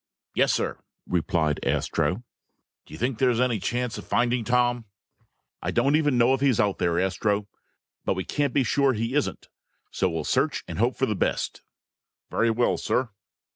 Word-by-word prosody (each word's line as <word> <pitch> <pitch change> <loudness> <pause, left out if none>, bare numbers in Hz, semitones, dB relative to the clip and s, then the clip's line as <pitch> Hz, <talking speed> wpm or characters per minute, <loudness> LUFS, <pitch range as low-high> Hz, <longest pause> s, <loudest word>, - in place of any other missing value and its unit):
"Yes, - - +3
sir," - - -1 0.3
replied 80 -3 0
Astro. 80 +8 0 0.6
"Do - - -14
you - - -9
think 120 -1 -1
there's 125 -3 +3
any 125 -4 +2
chance 125 +3 -2
of - - -8
finding 120 0 +1
Tom?" 120 0 +1 0.8
"I - - -2
don't 135 +5 +2
even 145 -4 +2
know 120 +2 +4
if 135 - -1
he's 135 -5 +3
out 100 -2 +1
here, 85 0 +2
Astro. 100 +3 0 0.6
But - - 0
we 95 - -2
can't 145 +4 -1
be 140 - +2
sure 135 +2 +2
he 115 +2 -2
isn't. 150 0 -1 0.4
So 95 - +1
we'll 80 -2 -3
search - - 0
and 85 - -6
hope 120 +3 +2
for 130 - +1
the 110 - -1
best." - - -1 0.7
"Very 115 - +2
well, 120 +2 +2
sir." 130 -2 0
120 Hz, 175 wpm, -26 LUFS, 95-125 Hz, 0.8 s, know